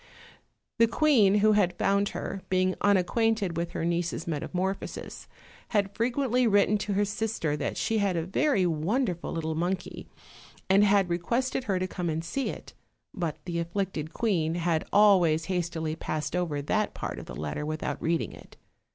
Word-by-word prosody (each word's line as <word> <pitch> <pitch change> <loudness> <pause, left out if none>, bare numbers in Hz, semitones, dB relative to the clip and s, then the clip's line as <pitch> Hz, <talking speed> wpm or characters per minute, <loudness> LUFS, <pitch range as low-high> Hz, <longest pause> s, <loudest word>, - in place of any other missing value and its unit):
The 230 - +6
queen 225 -7 +4
who 215 - +6
had 185 -4 +2
found 200 +1 +2
her, 195 - -5
being 185 0 +2
unacquainted 205 0 +2
with 170 +1 -3
her 165 - -2
niece's 170 -1 -1
metamorphosis, 180 +5 -4 0.4
had 200 -2 0
frequently 250 +1 +1
written 205 0 +3
to 205 - -2
her 205 +1 +2
sister 205 -7 -2
that 145 - -3
she 225 -1 0
had 195 -4 +1
a 165 - -1
very 195 - +2
wonderful 175 - -1
little 160 -1 -2
monkey, 175 +4 -3 0.6
and 195 +2 +5
had 200 -2 +4
re 170 0 -1
quested 250 +7 -1
her 195 -3 0
to 185 - -1
come 180 -2 -3
and 160 +1 -2
see 270 +10 -2
it; - - -8 0.4
but 165 -6 -3
the 170 -2 -2
afflicted 170 -2 -3
queen 170 -7 0
had 170 -2 0
always 180 -6 +5
hastily 165 -4 -2
passed 155 0 -3
over 160 -5 -1
that 215 +8 0
part - - -5
of - - -10
the - - -7
lette 75 -1 -4
r - - -3
with 155 0 -4
out - - -3
reading 165 0 0
it. - - -15
185 Hz, 175 wpm, -28 LUFS, 165-205 Hz, 0.6 s, The